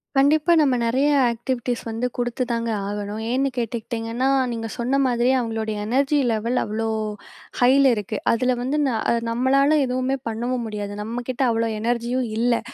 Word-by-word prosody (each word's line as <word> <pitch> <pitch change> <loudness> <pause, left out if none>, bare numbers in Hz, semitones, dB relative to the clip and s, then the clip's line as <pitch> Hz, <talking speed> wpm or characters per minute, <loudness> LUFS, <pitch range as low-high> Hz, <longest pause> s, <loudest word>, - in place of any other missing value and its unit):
கண்டிப்பா 295 +5 +4
நம்ம 275 -4 +3
நெறைய 260 +5 +2 0.2
ஆக்டிவிட்டீஸ் 240 0 -3
வந்து 225 +2 -2
குடுத்து 245 +1 -1
தாங்க 230 0 -1 0.2
ஆகணும். 205 +1 -4
ஏன்னு 270 +2 +1
கேட்டுகிட்டிங்கன்னா, 235 +2 -2 0.2
நீங்க 225 -1 -4
சொன்ன 245 +3 0
மாதிரியே 245 +1 +2
அவங்களுடைய 225 -2 -3
எனர்ஜி 275 +4 +2
லெவல் 230 +3 -1
அவ்ளோ 225 +2 -2 0.7
ஹய்ல 265 +2 +5
இருக்கு. 210 +1 -4
அதில 250 +2 +1
வந்து, 270 +4 -1
ந - - +1 0.4
நம்மளால 275 +5 +3
எதுவுமே 255 +1 -1
பண்ணவும் 240 +2 -2
முடியாது. 205 -1 -5
நம்ம 235 +3 -4
கிட்ட 255 +1 -3
அவ்ளோ 230 0 0
எனர்ஜியும் 240 +2 -1
இல்லை. 235 0 +2
240 Hz, 145 wpm, -23 LUFS, 225-260 Hz, 0.7 s, ஹய்ல